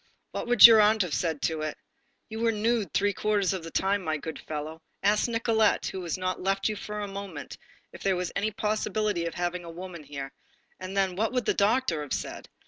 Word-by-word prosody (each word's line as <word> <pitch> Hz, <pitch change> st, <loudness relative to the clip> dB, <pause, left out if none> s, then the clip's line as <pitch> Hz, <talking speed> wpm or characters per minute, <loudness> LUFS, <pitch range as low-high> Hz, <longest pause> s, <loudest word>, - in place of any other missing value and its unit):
What -, -, -4 dB
would 245 Hz, -3 st, +9 dB
your 225 Hz, -2 st, +10 dB
aunt 210 Hz, 0 st, +4 dB
have 175 Hz, -5 st, -4 dB
said 160 Hz, -2 st, -1 dB
to 160 Hz, -1 st, 0 dB
it? 155 Hz, -1 st, -3 dB, 0.5 s
You 220 Hz, 0 st, -6 dB
were 230 Hz, 0 st, +2 dB
nude 220 Hz, 0 st, 0 dB
three 205 Hz, 0 st, +1 dB
quarters 205 Hz, -1 st, +1 dB
of 185 Hz, -3 st, -4 dB
the 165 Hz, -, -7 dB
time, 195 Hz, +3 st, 0 dB
my 155 Hz, -2 st, -1 dB
good 160 Hz, +1 st, -7 dB
fellow. 155 Hz, +1 st, -6 dB, 0.2 s
Ask 210 Hz, +3 st, +3 dB
Nicolette, 230 Hz, -2 st, +2 dB
who 190 Hz, -, -4 dB
has 175 Hz, 0 st, -3 dB
not 185 Hz, 0 st, -2 dB
left 195 Hz, +1 st, 0 dB
you 215 Hz, -, -1 dB
for 210 Hz, +1 st, -5 dB
a 205 Hz, -, -3 dB
moment, 195 Hz, -6 st, -7 dB, 0.4 s
if -, -, -11 dB
there 195 Hz, -1 st, +1 dB
was 180 Hz, 0 st, -3 dB
any 205 Hz, +2 st, 0 dB
possibility 210 Hz, -3 st, -1 dB
of 165 Hz, -, -6 dB
having 175 Hz, 0 st, -2 dB
a 170 Hz, -, -9 dB
woman 170 Hz, -1 st, -8 dB
here. 140 Hz, -1 st, -7 dB, 0.5 s
And 185 Hz, +1 st, -6 dB
then, 190 Hz, -2 st, +1 dB
what 220 Hz, +5 st, 0 dB
would 250 Hz, -3 st, 0 dB
the -, -, +2 dB
doctor 205 Hz, -5 st, +1 dB
have 145 Hz, -, -4 dB
said? -, -, -5 dB
195 Hz, 220 wpm, -27 LUFS, 170-215 Hz, 0.5 s, your